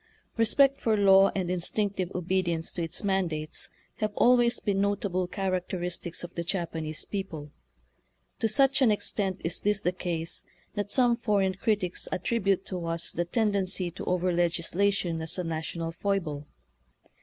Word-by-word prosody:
Respect 270 +5 +4
for 220 -2 +2
law 195 -1 +6
and 180 -2 -1
instinctive 185 +1 -1
obedi 185 +1 0
ence 165 -1 -2
to 175 - -3
its 165 +3 -3
mandates 170 -6 -1 0.3
have 215 -1 -1
always 240 -1 +4
been 200 -2 0
notable 200 -2 0
characteristics 180 -2 -3
of 175 - -7
the 170 - -3
Japanese 165 -4 -3
people. 165 -8 -5 0.9
To 225 - +2
such 275 +4 +3
an 255 - +6
extent 200 -2 -1
is 165 +1 -1
this 210 0 +1
the 180 - +1
case 170 -2 -3 0.3
that 205 -1 -3
some 245 -2 +4
foreign 200 -4 +1
critics 195 -2 -1
attribute 195 0 0
to 180 -3 -4
us 165 0 -2
the 175 - -1
tendency 190 -3 +1
to - - -7
over 180 0 +1
legislation 175 +1 +1
as 160 +3 -3
a 180 - -1
national 165 0 -3
foible. 165 -6 -2
185 Hz, 150 wpm, -28 LUFS, 170-205 Hz, 0.9 s, law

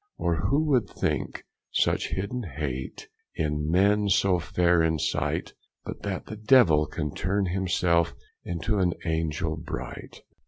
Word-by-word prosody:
Or 85 +2 0
who 145 +8 +2
would 125 -8 +2
think - - -2 0.3
such - - +1
hidden 100 +7 -3
hate 65 -4 -4 0.3
In 75 0 -1
men 100 +4 +3
so 95 -1 +3
fair 85 0 +2
in 80 -1 +2
sight, - - -1 0.3
But - - -7
that 100 -2 -4
the 110 - -7
Devill 105 - +5
can 75 -1 -4
turne 100 +2 0
him 95 +1 -1
selfe 85 -2 +2 0.3
Into 90 +5 -1
an 90 -2 +2
angell 80 0 -1
bright. 80 0 -7
90 Hz, 145 wpm, -27 LUFS, 80-100 Hz, 0.3 s, Devill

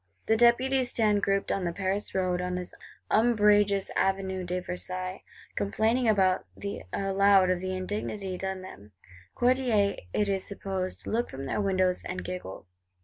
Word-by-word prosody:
The 220 - +3
Deputies 245 +2 +3
stand 210 -3 +2
grouped 195 0 0
on 195 - -1
the 170 - -1
Paris 195 +3 -2
Road, 180 -1 0
on 180 0 -2
this 180 0 -5 0.4
umbrageous 205 -3 +3
Avenue 190 -1 0
de 180 +1 -2
Versailles; 185 +1 -5 0.3
complaining 225 +4 +1
aloud 190 -3 +3 1.1
of 180 - 0
the 185 +1 -3
indignity 195 0 -4
done 190 0 -4
them. 105 - -12 0.4
Courtiers, 240 -5 +2
it 210 - +1
is 195 -1 0
supposed, 190 -2 -4
look 235 +2 -1
from 135 +1 -7
their 135 - -1
windows, 185 -2 +1
and 180 0 -5
giggle. 180 - -6
195 Hz, 145 wpm, -28 LUFS, 185-210 Hz, 1.1 s, The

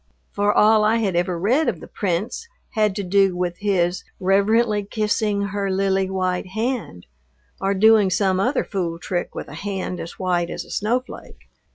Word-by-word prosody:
For 205 0 +1
all 215 +1 +5
I 215 +2 +3
had 210 -6 0
ever 175 0 0
read 250 - +2
of - - -4
the - - -10
Prince 205 - -3 0.2
had 210 -3 +1
to 200 - -2
do 195 0 +2
with 175 -1 -2
his 185 -3 0 0.2
"reverently 205 +3 +2
kissing 210 0 0
her 200 0 -2
lily 190 0 +1
white 185 -1 -1
hand," 220 - -3 0.6
or 195 +1 +1
doing 215 0 +5
some 190 0 +1
other 250 +8 +1
fool 175 -5 -3
trick 175 +1 -4
with - - -5
a - - -10
hand 190 -3 -4
as 165 - -7
white 175 -2 0
as - - -5
a - - -14
snowflake. 245 +5 -3
195 Hz, 175 wpm, -22 LUFS, 185-215 Hz, 0.6 s, all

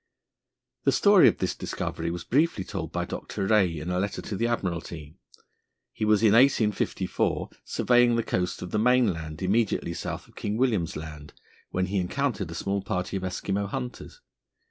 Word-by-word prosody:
The - - +4
story 200 -2 +6
of - - +3
this 95 - -1
discovery 85 +1 -4
was 85 0 -4
briefly 145 - +1
told - - -5
by - - -2
Dr. 100 - -4
Rae 95 -6 +3
in 80 +4 -4
a 90 - 0
letter 100 +1 -2
to 105 - -4
the 115 +4 0
Admiralty. 85 -8 -3 0.8
He 110 - -2
was, 105 0 +3
in 105 -2 +6
1854, 115 -4 +2
surveying 120 -1 +3
the 115 - +1
coast 90 -3 -2
of 90 - -7
the 105 - +1
mainland 100 -10 +1
immediately 100 -3 +1
south 85 - -5
of - - -22
King 105 +1 -3
William's 110 -10 +1
Land, 75 -1 -8 0.4
when 90 0 0
he 95 +2 -1
encountered 105 0 -1
a 85 - -7
small 100 +2 -1
party 90 +1 -3
of 95 - -2
Eskimo 95 +2 -2
hunters. 125 - -6
100 Hz, 170 wpm, -27 LUFS, 90-115 Hz, 0.8 s, story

